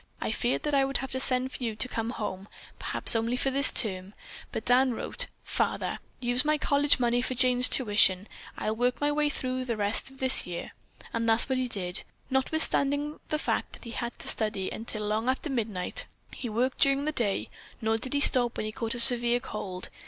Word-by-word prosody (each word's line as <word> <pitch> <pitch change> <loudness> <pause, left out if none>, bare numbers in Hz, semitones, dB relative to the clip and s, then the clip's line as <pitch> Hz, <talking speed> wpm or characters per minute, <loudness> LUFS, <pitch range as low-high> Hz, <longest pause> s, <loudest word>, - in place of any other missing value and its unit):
I - - -3
feared 240 +3 -1
that 295 - -2
I 275 -1 +4
would 270 0 -1
have 265 0 -6
to 260 - -3
send 260 0 +1
for 255 - -8
you 225 -2 -3
to 235 - -1
come 225 -2 -4
home, 200 -4 -5 0.3
perhaps - - +5
only 230 +2 0
for 270 - 0
this 275 +1 +8
term, 195 -3 +2 0.4
but 220 - -5
Dan 250 0 +3
wrote, - - -3 0.2
'Father, - - -2 0.2
use 245 0 +2
my 305 0 +1
college 285 -1 +3
money 240 0 +1
for 255 +1 -3
Jane's 250 0 +3
tuition. 205 -5 +3 0.3
I'll 215 - -2
work 245 +2 0
my 290 0 0
way 295 0 0
through 255 -2 -4
for 255 - -4
the 235 -3 -3
rest 205 +5 0
of 270 - -17
this 260 -6 +3
year.' 175 -1 -6 0.4
And 230 0 -1
that 225 +1 +4
is - - +5
what 260 -1 0
he 255 - -1
did. 185 -5 -3 0.3
Notwithstanding 285 +1 0
the 305 - 0
fact - - -3
that - - -11
he 235 - -8
had 235 +1 -5
to - - -9
study 210 -4 -1
until 215 -1 -5
long 215 +4 -1
after 270 +3 -2
midnight, 215 -8 -2 0.3
he 245 - -6
worked 245 +4 -1
during 275 +1 +2
the 305 - 0
day, 225 -9 -1 0.3
nor 220 0 -1
did 260 +4 -4
he 285 - +1
stop 245 -4 +4
when - - -3
he 215 - -4
caught 230 +1 -4
a - - -2
severe 240 -1 +5
cold. 190 -6 -7
245 Hz, 220 wpm, -27 LUFS, 220-265 Hz, 0.4 s, this